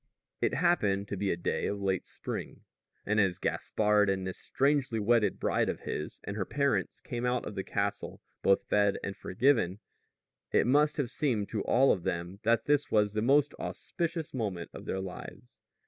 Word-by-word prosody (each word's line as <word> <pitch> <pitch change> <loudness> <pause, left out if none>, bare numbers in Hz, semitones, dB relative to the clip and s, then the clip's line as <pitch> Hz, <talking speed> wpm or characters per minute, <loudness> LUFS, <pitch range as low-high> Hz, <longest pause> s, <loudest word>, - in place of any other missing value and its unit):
It - - +1
happened 105 - +2
to - - -2
be 100 +1 -1
a 85 - 0
day 85 - -1
of 100 - -2
late 95 -2 -1
spring; - - -6 0.4
and 105 +1 +2
as 95 -4 +2
Gaspard 105 -1 +1
and 95 -1 0
this 95 - -5
strangely 135 -4 +1
wedded 105 -1 +2
bride - - +1
of - - -3
his 75 - -5
and 100 - -5
her 105 - -1
parents 140 +5 0
came 120 -2 -5
out 125 0 0
of - - -5
the 95 -1 -3
castle, 100 +1 -2 0.2
both 100 - +3
fed 100 -1 +2
and 100 - -4
forgiven, 110 -4 +1 0.7
it - - +3
must 150 +4 +3
have 130 -5 -1
seemed 115 -10 0
to 110 - -2
all 135 +3 +5
of 95 - 0
them 85 +3 -3
that 115 0 +2
this 145 0 +2
was 105 -1 +2
the 110 - 0
most 140 +5 +3
auspicious 165 -3 -3
moment 100 -9 -3
of - - -9
their 95 - -2
lives. 95 -9 -9
105 Hz, 185 wpm, -30 LUFS, 95-130 Hz, 0.7 s, all